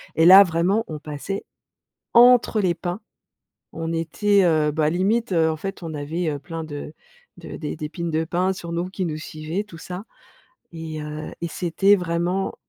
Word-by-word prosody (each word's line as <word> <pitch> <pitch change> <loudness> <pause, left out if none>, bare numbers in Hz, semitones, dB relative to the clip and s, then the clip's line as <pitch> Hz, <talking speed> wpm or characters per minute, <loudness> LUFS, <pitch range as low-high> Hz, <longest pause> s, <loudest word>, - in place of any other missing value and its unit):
et 160 - +4
là, 190 +3 +10
vraiment, 180 +5 +1
on 155 - -5
passait 150 +6 -5 0.7
entre, 240 -2 +6
les 180 -3 +1
pins, 175 +4 -4 0.7
on 165 0 -4
était 195 +5 +2
heu, 155 -3 +3
bah, 150 0 +1
limite, 205 +6 0
heu, 160 -2 +3
en 160 - -1
fait, 195 +3 -6
on 165 -1 -5
avait, 160 +4 -3
heu 145 - -2
plein, 165 +2 -6
de 150 -1 -7 0.4
de - - -9
d'é 150 - -5
d'épines 165 +2 -5
de 160 +1 0
pins, 180 +3 0
sur 170 -2 -8
nous, 170 +2 -2
qui 190 -1 -3
nous 155 -2 -3
suivaient, 155 +4 -4
tout 205 -6 -13
ça 180 +4 -7 0.7
et 160 -2 -6
heu, 150 +1 -6
et 170 - -1
c'était 190 +5 +2
vraiment, 180 +1 -1
170 Hz, 180 wpm, -23 LUFS, 155-190 Hz, 0.7 s, là